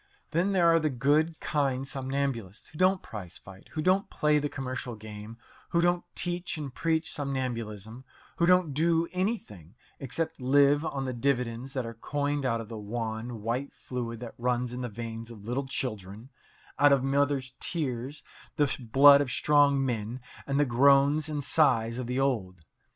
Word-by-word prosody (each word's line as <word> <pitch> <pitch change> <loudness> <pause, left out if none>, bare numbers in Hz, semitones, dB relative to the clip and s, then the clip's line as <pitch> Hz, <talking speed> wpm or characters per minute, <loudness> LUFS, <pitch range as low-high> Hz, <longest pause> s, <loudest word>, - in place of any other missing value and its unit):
Then 175 +5 +1
there 180 -3 +4
are 165 0 +5
the 155 -1 0
good, 150 +5 +1
kind 135 -4 -1
somnambulists 135 -7 -3
who 155 - -13
don't 185 +1 +3
prize 95 -5 -8
fight, 95 0 -14
who 155 - -2
don't 190 +3 +2
play 150 0 +2
the 145 0 -2
commercial 130 -3 -5
game, 105 +1 -10 0.3
who 170 - +1
don't 175 0 +2
teach 175 -1 -2
and 145 -4 -6
preach 160 +1 -1
somnambulism, 120 -5 -4 0.3
who 170 - +2
don't 180 -4 +4
do 165 +3 +2
anything 180 - -3 0.2
except 160 +3 -3
live 140 +3 +4
on 135 -4 -3
the 130 - -3
dividends 125 0 -1
that 130 -3 -2
are 115 - -6
coined 145 +3 -2
out 115 -2 0
of 115 - -7
the 115 -1 -7
wan, 110 +1 -5
white 125 +5 -2
fluid 120 -3 -5
that 120 - -7
runs 125 0 0
in 125 - -5
the 125 - -3
veins 115 +1 -7
of 105 -4 -11
little 130 +4 -2
children, 110 -2 -4 0.5
out 145 0 +6
of 135 -2 +4
mothers' 135 -1 0
tears, 135 -3 -2 0.3
the 145 -2 +1
blood 140 +4 +7
of 140 - -2
strong 140 +1 +3
men, 115 0 -3 0.3
and 140 0 0
the 145 - +4
groans 140 +4 +4
and 150 -2 -3
sighs 115 -6 +2
of 125 - -4
the 125 +2 -1
old. 105 -10 -1
135 Hz, 175 wpm, -28 LUFS, 115-145 Hz, 0.5 s, blood